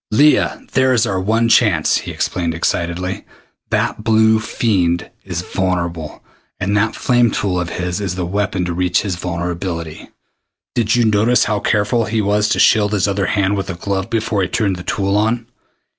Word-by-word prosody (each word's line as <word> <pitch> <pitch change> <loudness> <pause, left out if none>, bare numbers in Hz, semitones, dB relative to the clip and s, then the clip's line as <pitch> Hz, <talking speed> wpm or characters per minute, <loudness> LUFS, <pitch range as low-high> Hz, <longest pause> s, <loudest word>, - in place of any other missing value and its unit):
"Leah, 145 +8 +3
there 130 -1 +3
is 115 - +3
our 95 -1 -1
one 115 +4 +1
chance!" 105 -9 +3
he - - -5
explained 85 -2 -2
excitedly. 85 +2 -2 0.5
"That 110 - -1
blue 110 -1 +4
fiend 95 -6 0
is 90 -2 -4
vulnerable, 85 -4 -3 0.4
and 100 +2 -1
that 105 +2 +1
flame 120 -1 +2
tool 95 -3 -1
of 85 -1 -3
his 90 +2 -3
is 95 -3 -3
the 90 -1 -2
weapon 95 0 -1
to 90 - -3
reach 90 +1 +1
his 95 -4 -2
vulnerability. 85 -2 -4 0.6
Did 115 -3 +1
you 120 -1 +3
notice 110 +3 +3
how 105 -1 0
careful 105 +3 +1
he 110 0 -1
was 105 +1 +1
to - - +1
shield 105 -1 +4
his 105 -1 +1
other 100 -1 0
hand 100 -1 +1
with 95 - -4
a - - -3
glove 95 +3 -3
before 110 -3 -1
he 90 - 0
turned 100 -2 -1
the - - -7
tool 100 +1 -1
on? 110 +3 +1
100 Hz, 180 wpm, -18 LUFS, 90-110 Hz, 0.6 s, blue